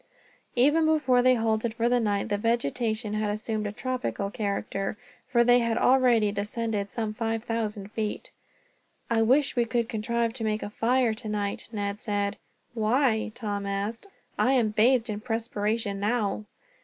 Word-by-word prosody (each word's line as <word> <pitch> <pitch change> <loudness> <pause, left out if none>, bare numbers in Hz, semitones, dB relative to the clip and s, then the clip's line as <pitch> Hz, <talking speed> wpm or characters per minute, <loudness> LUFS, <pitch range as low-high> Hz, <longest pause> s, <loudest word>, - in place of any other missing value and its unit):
Even 295 +6 +4
before 295 -6 +3
they 255 0 +5
halted 225 0 0
for 230 0 +1
the 245 0 +3
night, 205 -1 0
the 205 - +1
vegetation 225 - 0
had 215 0 0
assumed 215 0 -2
a - - -3
tropical 245 -4 -3
character, 200 -1 -2 0.3
for 240 -2 +3
they 245 +1 +5
had 230 -1 0
already 245 -6 +4
descended 210 0 -2
some 220 -1 -3
five 225 0 -2
thousand 210 -3 -3
feet. 215 -2 -4 0.8
"I 225 -1 +3
wish 265 +6 +3
we 240 -1 +2
could 235 0 0
contrive 230 +1 -1
to 235 -2 -4
make 215 0 -1
a 205 - -5
fire 240 +1 +2
tonight," 210 -3 -3
Ned 205 -2 -3
said. 205 -2 -1 0.4
"Why?" 225 0 +1
Tom 205 -4 -3
asked. 205 - -3 0.3
"I 260 - +4
am 240 -5 +3
bathed 230 +3 +3
in 210 -2 -3
perspiration, 220 -2 -2
now." 210 -1 0
225 Hz, 155 wpm, -27 LUFS, 210-240 Hz, 0.8 s, they